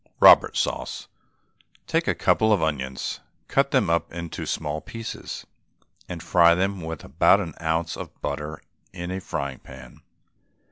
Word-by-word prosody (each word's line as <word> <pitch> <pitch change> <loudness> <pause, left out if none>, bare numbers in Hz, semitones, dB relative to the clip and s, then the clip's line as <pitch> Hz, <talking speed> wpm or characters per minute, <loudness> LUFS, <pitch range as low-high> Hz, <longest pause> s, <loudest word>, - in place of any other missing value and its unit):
ROBERT - - +7
SAUCE. - - -2 0.8
Take - - 0
a - - +2
couple 110 0 +3
of 100 -6 +3
onions, 65 -4 -2 0.3
cut 140 0 +2
them 130 - +2
up 85 0 0
into 85 -1 -6
small 75 +1 -2
pieces, 115 -1 -7 0.6
and 85 -2 -6
fry 85 -1 +5
them 95 +1 -1
with 80 -1 -6
about 80 +8 +4
an 85 -6 -4
ounce 80 0 -1
of - - -9
butter 75 +1 -4 0.3
in 90 +1 -5
a 95 +1 -3
frying 70 -6 -4
pan. 65 -2 -13
85 Hz, 145 wpm, -25 LUFS, 75-95 Hz, 0.8 s, ROBERT